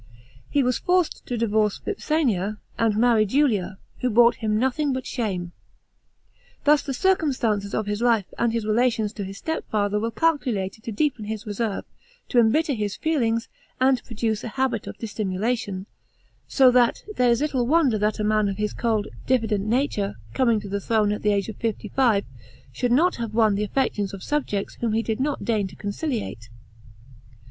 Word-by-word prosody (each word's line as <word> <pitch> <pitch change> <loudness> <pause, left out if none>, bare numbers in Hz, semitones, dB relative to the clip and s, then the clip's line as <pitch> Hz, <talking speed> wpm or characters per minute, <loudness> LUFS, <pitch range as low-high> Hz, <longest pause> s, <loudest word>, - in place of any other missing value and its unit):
He 285 - +2
was 250 -1 +1
forctd 360 -2 +1
to 245 - -3
divorce 215 -2 +1
Vipsania 245 - -1 0.2
and 220 -2 +2
marry 230 -1 +4
Julia, 210 -6 +1 0.2
who 250 - 0
brought 235 +1 +5
him 215 -2 0
nothing 265 +4 +1
but 260 0 -4
shame. 190 -10 -3 1.1
Thus 295 0 +5
the 280 - -5
circumstances 245 - +1
of 215 - -1
his 205 +1 -3
life, 230 -5 +3
and 235 -1 +2
his 230 -2 -2
relations 220 -1 +1
to 205 - -5
his 195 +1 -7
stei 320 0 -3
father 205 -1 0
were 225 +2 -1
calculated 230 -8 -1
to 230 - -3
deepen 245 -1 -1
his 215 0 -5
reserve, 210 0 -3 0.4
to 245 - +3
embitter 280 +7 +3
his 210 -4 -2
feelings, 230 -8 0 0.3
and 260 0 +3
produce 220 -2 -2
a - - -4
ha'it 265 +2 -1
of - - -7
dissimulation; 205 -1 -2 0.6
so 260 -2 +5
that 245 -1 +3
there 250 -1 +4
is 235 0 +3
little 270 -5 0
wonder 280 -7 +3
that 210 +1 +1
a - - 0
man 215 -1 +2
of 195 - -4
his 210 0 -1
cold, 220 -3 0 0.2
diffident 220 -5 +1
nature, 225 -4 0 0.2
coming 235 -4 +2
to 205 - -8
the 200 +1 -3
throne 215 -1 +2
at 210 - -3
the 210 - +2
age 200 -1 0
of 220 - -7
fifty 220 -2 -3
five, 230 -6 +2 0.5
should 245 -2 -1
not 335 +9 +3
have 230 -3 -4
won 220 -2 +4
the 200 +1 0
affections 205 -4 -1
of 190 - -10
subjects 260 -9 -2
whom 230 -2 0
he 225 +1 +1
did 220 0 -2
not 285 +2 -1
deign 215 -4 +1
to 185 - -13
conciliate. 205 - -4
225 Hz, 180 wpm, -24 LUFS, 210-255 Hz, 1.1 s, brought